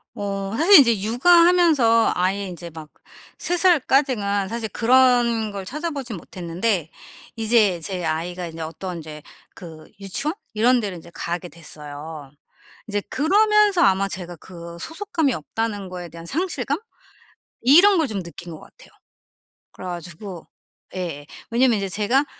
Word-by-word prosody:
어 200 -1 -4
사실 340 - +8
이제 235 -7 +4
육아하면서 300 - +4
아예 190 +3 0
인제 175 -2 -8
막 155 -1 -10 0.5
3 355 - -1
살까지가 260 - +2
사실 230 0 -4
그런 240 -1 +3
걸 200 -1 -6
찾아보진 280 - -5
못했는데 175 +1 -3 0.5
이제 220 -5 +2
제 180 +1 -4
아이가 175 +3 -3
이제 165 0 -8
어떤 170 +2 -6
이제 150 -1 -9 0.3
그 160 -3 -12
유치원 275 - -2 0.2
이런 240 +3 +3
데를 195 -5 -4
이제 170 +1 -14
가게 175 +2 -4
됐어요. 150 -2 -9 0.6
이제 205 -1 -1
그러면서 415 +4 +3
아마 195 0 +3
제가 180 -2 -7
그 170 0 -11
소속감이 325 - -2
없다는 205 +4 -4
거에 180 -1 -7
대한 165 +1 -11
상실감? 295 - -2 0.8
이런 350 - +7
걸 320 - +2
좀 200 -6 -4
느낀 170 0 -10
것 155 - -10
같아요. - - -18 0.8
그래 185 - -11
가지고 175 +1 -8 0.5
예. 165 -6 -5 0.3
왜냐하면 240 -1 +3
이제 195 -1 -2
제가 225 +9 +1
205 Hz, 290 characters per minute, -22 LUFS, 175-260 Hz, 0.8 s, 사실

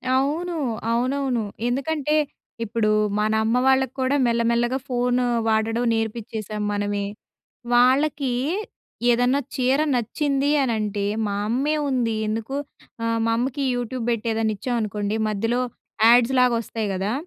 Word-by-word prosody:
అవును. 315 +6 0 0.4
అవునవును. 255 0 0 0.2
ఎందుకంటే, 300 +3 0 0.5
ఇప్పుడూ 225 -1 0 0.3
మనమ్మ 220 +2 +1
వాళ్ళక్కూడా, 265 +1 +2
మెల్లమెల్లగా 235 +2 +1
ఫోను 245 0 +1 0.2
వాడడం 225 +2 +1
నేర్పిచ్చేసాం 220 -1 -3
మనమే. 205 0 -1 0.7
వాళ్ళకీ 265 +2 +3 0.8
ఏదన్నా 245 +3 +3 0.2
చీర 260 +2 +2 0.2
నచ్చింది 275 +4 0
అనంటే, 210 -4 -1 0.2
మా 200 - -2
అమ్మే 270 +7 +1
ఉంది 240 -4 0
ఎందుకు, 225 +5 -3 0.5
ఆహ్, 230 0 0
మా 230 - +2
అమ్మకి 265 +3 -1
యూట్యూబ్ 245 0 -3
బెట్టేదన్నా 225 -1 0
ఇచ్చామనుకోండి, 215 -3 -2
మధ్యలో 225 +4 0 0.5
యాడ్స్‌లాగొస్తాయి 235 -2 +3
గదా! 195 +4 -1
235 Hz, 100 wpm, -23 LUFS, 220-265 Hz, 0.8 s, వాళ్ళకీ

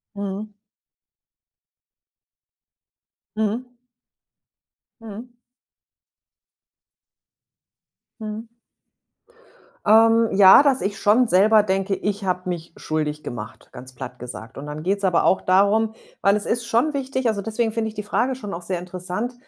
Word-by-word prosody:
Mhm. 200 +1 -5 2.8
Mhm. 235 +4 -2 1.2
Mhm. 225 +2 -9 2.9
Mhm. 215 +1 -6 1.4
Ähm, 225 +1 +5
ja, 195 +6 +8
dass 275 -3 +2
ich 200 +2 -2
schon 225 +4 +3
selber 210 +3 +5
denke: 195 0 -1
„Ich 200 +1 -3
habe 180 0 -2
mich 170 -2 -5
schuldig 150 -1 -3
gemacht“, 110 -1 -8
ganz 130 0 -11
platt 125 0 -9
gesagt. 120 -1 -9
Und 140 - -7
dann 150 +1 -7
geht's 195 +3 -1
aber 180 -3 +2
auch 190 - +3
darum 205 +4 +2 0.3
weil 200 +1 +4
es 210 - -1
ist 235 0 -1
schon 245 +7 +1
wichtig, 265 -2 -2
also, 210 -3 0
deswegen 225 +2 -1
finde 220 0 -2
ich - - -11
die 210 -1 -5
Frage 245 +5 0
schon 205 -6 -7
auch 170 - -6
sehr 180 0 -3
interessant, 180 +6 -5
205 Hz, 125 wpm, -22 LUFS, 180-225 Hz, 2.9 s, ja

